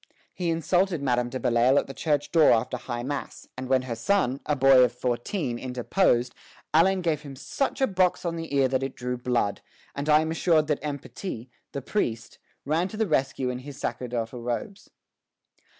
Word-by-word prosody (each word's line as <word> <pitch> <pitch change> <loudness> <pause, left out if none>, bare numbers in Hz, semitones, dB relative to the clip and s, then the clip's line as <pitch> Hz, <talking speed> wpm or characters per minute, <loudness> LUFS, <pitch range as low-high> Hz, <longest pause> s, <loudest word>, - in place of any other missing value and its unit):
"He 175 -2 -2
insulted 170 0 +1
Madame 125 -2 +1
de 130 - -4
Belleisle 125 +1 +3
at - - +2
the 135 - -8
church 145 0 -1
door 160 -3 +6
after 115 +2 0
high 120 -1 -5
mass, 145 +2 -5
and 130 0 -6
when 130 -1 +3
her 125 -2 -4
son, 135 - +1
a 150 - +2
boy 135 -1 +6
of 125 - +3
fourteen, 125 - -2
interposed, 125 0 +1 0.4
Allein 185 +4 +4
gave 160 -4 0
him 140 -2 -9
such 270 - -2
a - - +6
box 185 -5 +1
on 170 -1 -1
the 165 -2 -6
ear 135 -1 +4
that 130 0 0
it 135 -1 -4
drew 125 0 -3
blood; 120 -4 -1 0.3
and 140 +2 -4
I 150 0 +6
am 160 0 -2
assured 165 -2 +3
that 150 - +1
M. 145 -2 -3
Petit, 130 - -7 0.2
the 140 - -5
priest, 120 - -2 0.3
ran 160 +6 +1
to 215 - -8
the 220 - +2
rescue 135 -6 0
in 125 - -5
his 140 +1 -10
sacerdotal 120 -2 -4
robes." 125 - -4
135 Hz, 195 wpm, -26 LUFS, 125-165 Hz, 0.4 s, door